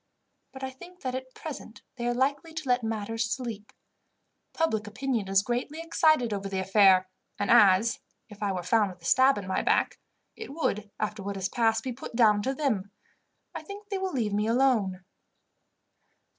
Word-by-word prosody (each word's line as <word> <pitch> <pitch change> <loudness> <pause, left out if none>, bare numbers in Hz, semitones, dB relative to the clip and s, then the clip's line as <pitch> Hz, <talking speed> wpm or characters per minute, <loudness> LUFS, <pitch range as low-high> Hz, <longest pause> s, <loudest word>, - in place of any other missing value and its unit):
But 265 0 -10
I 265 - -3
think 355 +7 -14
that 255 -2 -3
at 260 0 -6
present 285 -7 -8
they 240 -1 -3
are 240 - +1
likely 285 +5 -1
to 310 -3 -5
let 250 0 +3
matters 225 0 -2
sleep. 225 -4 -5 0.8
Public 220 -11 -1
opinion 230 -1 -2
is 195 0 +3
greatly 245 +7 -3
excited 310 -7 +2
over 195 -1 -4
the 195 - -3
affair, 190 -1 +5 0.3
and 205 - 0
as, 210 0 +5 0.3
if 210 -1 -14
I 205 -1 0
were 180 -2 -3
found 210 +2 +2
with 180 -1 -16
a - - -11
stab 260 +6 +5
in 200 - -5
my 185 0 -1
back, - - +1 0.4
it 440 -10 -8
would, 210 -10 -1
after 215 0 -3
what 200 +1 -4
has 190 0 -2
passed, 225 -1 +1
be 255 - -3
put 235 -1 -9
down 215 -3 +4
to 265 +5 -2
them, 220 -10 -1 0.6
I - - -5
think 405 0 -10
they 395 -2 -2
will 380 0 -2
leave 225 - -1
me 210 +1 +1
alone." 225 -7 +2
230 Hz, 185 wpm, -28 LUFS, 205-265 Hz, 0.8 s, affair